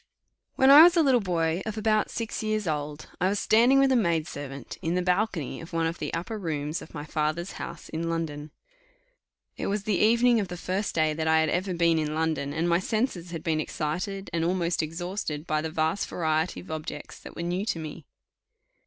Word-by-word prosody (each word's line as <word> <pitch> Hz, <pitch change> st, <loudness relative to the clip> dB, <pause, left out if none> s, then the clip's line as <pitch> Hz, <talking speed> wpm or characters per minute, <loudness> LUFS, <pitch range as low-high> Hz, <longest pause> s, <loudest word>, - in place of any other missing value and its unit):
When 265 Hz, +1 st, +6 dB
I 290 Hz, +2 st, +11 dB
was 345 Hz, +1 st, +7 dB
a 330 Hz, -, +6 dB
little 265 Hz, -4 st, +4 dB
boy 170 Hz, -2 st, 0 dB
of 220 Hz, 0 st, -5 dB
about 215 Hz, 0 st, +2 dB
six 230 Hz, 0 st, -4 dB
years 215 Hz, -1 st, -1 dB
old, 150 Hz, -1 st, -3 dB
I 185 Hz, -, +3 dB
was 205 Hz, -, 0 dB
standing 235 Hz, +6 st, +4 dB
with 275 Hz, 0 st, +4 dB
a -, -, +4 dB
maid 170 Hz, -9 st, +2 dB
servant 140 Hz, -4 st, -7 dB
in 165 Hz, +2 st, -1 dB
the 180 Hz, -, +1 dB
balcony 180 Hz, -, -1 dB
of 165 Hz, +1 st, -11 dB
one 165 Hz, 0 st, +1 dB
of 165 Hz, +1 st, -2 dB
the -, -, -3 dB
upper 210 Hz, +6 st, -4 dB
rooms 155 Hz, -3 st, -3 dB
of -, -, -12 dB
my 145 Hz, -1 st, -5 dB
father's 155 Hz, +4 st, -2 dB
house 170 Hz, -, -7 dB
in 165 Hz, +1 st, -3 dB
London 155 Hz, -3 st, -3 dB, 1.1 s
it -, -, -3 dB
was 200 Hz, 0 st, -1 dB
the 205 Hz, -3 st, 0 dB
evening 235 Hz, +2 st, +4 dB
of 200 Hz, -, -1 dB
the 180 Hz, 0 st, -6 dB
first 190 Hz, +4 st, -2 dB
day 155 Hz, -1 st, +2 dB
that 160 Hz, +1 st, -2 dB
I 160 Hz, 0 st, +4 dB
had 160 Hz, -, +1 dB
ever 185 Hz, +2 st, -1 dB
been 170 Hz, -1 st, +3 dB
in 155 Hz, 0 st, -2 dB
London, 160 Hz, -3 st, -1 dB
and 160 Hz, +3 st, -1 dB
my 170 Hz, 0 st, +3 dB
senses 195 Hz, -3 st, -2 dB
had 165 Hz, -2 st, -6 dB
been 160 Hz, -2 st, 0 dB
excited, 175 Hz, +6 st, -3 dB
and 165 Hz, -1 st, 0 dB
almost 170 Hz, 0 st, 0 dB
exhausted, 165 Hz, -1 st, -4 dB
by 155 Hz, -2 st, 0 dB
the 160 Hz, -, -3 dB
vast 160 Hz, +4 st, 0 dB
variety 160 Hz, 0 st, -1 dB
of 180 Hz, -, -11 dB
objects 155 Hz, -1 st, -6 dB
that -, -, -11 dB
were 170 Hz, -, -4 dB
new 175 Hz, +3 st, -1 dB
to -, -, 0 dB
me. 155 Hz, -1 st, -8 dB
170 Hz, 215 wpm, -27 LUFS, 160-200 Hz, 1.1 s, I